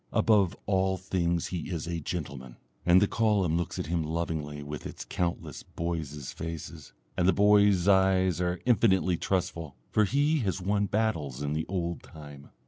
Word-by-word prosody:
Above 100 Hz, -5 st, +3 dB
all 95 Hz, -1 st, +1 dB
things 85 Hz, -2 st, -1 dB
he 90 Hz, -2 st, -4 dB
is 85 Hz, -4 st, -3 dB
a 85 Hz, 0 st, -3 dB
gentleman. 70 Hz, -6 st, -6 dB, 0.3 s
And 90 Hz, +1 st, +7 dB
the 105 Hz, -, +3 dB
column 105 Hz, -8 st, +1 dB
looks 85 Hz, 0 st, -2 dB
at -, -, -3 dB
him 85 Hz, +2 st, -1 dB
lovingly 80 Hz, -2 st, -3 dB
with 75 Hz, +1 st, -6 dB
its -, -, -8 dB
countless 85 Hz, -1 st, -3 dB
boys' 80 Hz, -5 st, -5 dB
faces, 80 Hz, -2 st, -7 dB, 0.2 s
and 90 Hz, -, +1 dB
the 95 Hz, -, +5 dB
boys' 100 Hz, -3 st, +4 dB
eyes 95 Hz, -2 st, +3 dB
are 90 Hz, 0 st, -1 dB
infinitely 95 Hz, -7 st, +3 dB
trustful, 85 Hz, -6 st, -2 dB, 0.2 s
for 110 Hz, -, +3 dB
he 145 Hz, +8 st, +2 dB
has 100 Hz, -6 st, -1 dB
won 100 Hz, +2 st, 0 dB
battles 80 Hz, -, -1 dB
in 75 Hz, 0 st, -1 dB
the 80 Hz, +1 st, -2 dB
old 85 Hz, -2 st, -3 dB
time. 75 Hz, -3 st, -12 dB
90 Hz, 165 wpm, -28 LUFS, 80-95 Hz, 0.3 s, And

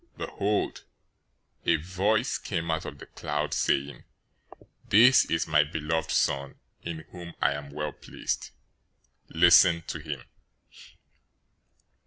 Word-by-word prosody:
Behold, 105 Hz, +1 st, -2 dB, 0.8 s
a 85 Hz, -, +3 dB
voice 95 Hz, -, 0 dB
came 85 Hz, -4 st, -3 dB
out 80 Hz, -, -2 dB
of 75 Hz, -, -7 dB
the -, -, -11 dB
cloud, 75 Hz, 0 st, -3 dB
saying, 70 Hz, +1 st, 0 dB, 0.9 s
"This 125 Hz, +5 st, +7 dB
is 80 Hz, 0 st, 0 dB
my 75 Hz, -2 st, +4 dB
beloved 80 Hz, +1 st, -3 dB
Son, 70 Hz, 0 st, 0 dB, 0.3 s
in 85 Hz, -2 st, -6 dB
whom 85 Hz, -2 st, -10 dB
I -, -, +3 dB
am 70 Hz, -1 st, -6 dB
well 75 Hz, +1 st, -4 dB
pleased. -, -, -5 dB, 0.8 s
Listen 85 Hz, 0 st, +5 dB
to 80 Hz, -, -5 dB
him." 75 Hz, -5 st, -6 dB
80 Hz, 115 wpm, -27 LUFS, 75-90 Hz, 0.9 s, This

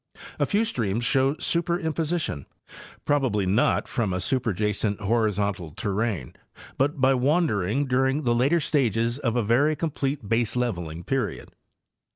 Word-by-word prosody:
A -, -, +2 dB
few 215 Hz, +2 st, +2 dB
streams 115 Hz, -, -1 dB
show 135 Hz, +2 st, +2 dB
superimposition, 165 Hz, -, -1 dB, 0.6 s
probably 130 Hz, -9 st, +1 dB
not 100 Hz, +6 st, +2 dB
from 105 Hz, -6 st, -1 dB
a -, -, -1 dB
superjacent 105 Hz, -2 st, -1 dB
horizontal 100 Hz, -6 st, 0 dB
terrane, 100 Hz, -, -2 dB, 0.5 s
but 140 Hz, +2 st, +1 dB
by 130 Hz, +1 st, +4 dB
wandering 130 Hz, -, +1 dB
during 135 Hz, +3 st, +1 dB
the 120 Hz, -2 st, +2 dB
later 135 Hz, +8 st, +3 dB
stages 120 Hz, -5 st, 0 dB
of 120 Hz, -5 st, -1 dB
a 120 Hz, -, +1 dB
very 135 Hz, +8 st, +3 dB
complete 140 Hz, -6 st, -3 dB
baseleveling 110 Hz, -8 st, -1 dB
period. 135 Hz, -1 st, -2 dB
120 Hz, 125 wpm, -25 LUFS, 105-145 Hz, 0.6 s, by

